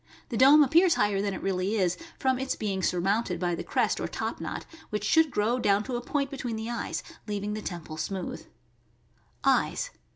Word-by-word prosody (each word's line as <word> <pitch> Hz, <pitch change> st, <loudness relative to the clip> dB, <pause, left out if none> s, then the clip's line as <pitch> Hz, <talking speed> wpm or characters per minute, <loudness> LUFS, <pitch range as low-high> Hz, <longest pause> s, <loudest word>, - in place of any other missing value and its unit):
The 235 Hz, -, -3 dB
dome 285 Hz, +5 st, +8 dB
ap 270 Hz, -, -1 dB
pears 345 Hz, +1 st, +5 dB
higher 205 Hz, -1 st, +2 dB
than 200 Hz, -1 st, -1 dB
it -, -, -7 dB
really 190 Hz, +2 st, 0 dB
is, 185 Hz, -3 st, +2 dB, 0.2 s
from 260 Hz, -1 st, +1 dB
its 265 Hz, 0 st, -1 dB
being 195 Hz, -3 st, -2 dB
surmounted 185 Hz, +1 st, 0 dB
by 175 Hz, -1 st, 0 dB
the 170 Hz, -, -3 dB
crest -, -, +1 dB
or -, -, -2 dB
top -, -, -4 dB
knot, -, -, -5 dB, 0.2 s
which 210 Hz, -1 st, -3 dB
should 320 Hz, +7 st, +4 dB
grow 230 Hz, +1 st, +1 dB
down 205 Hz, -2 st, +3 dB
to 255 Hz, +1 st, -4 dB
a 240 Hz, -, -2 dB
point 280 Hz, +2 st, -1 dB
between 255 Hz, -4 st, -4 dB
the 220 Hz, +2 st, -4 dB
eyes, 235 Hz, -, -3 dB, 0.2 s
leaving 205 Hz, 0 st, -2 dB
the 215 Hz, -, -4 dB
temple 170 Hz, -5 st, -6 dB
smooth. 185 Hz, +3 st, -4 dB, 1.0 s
Eyes. -, -, +2 dB
210 Hz, 200 wpm, -28 LUFS, 195-260 Hz, 1.0 s, dome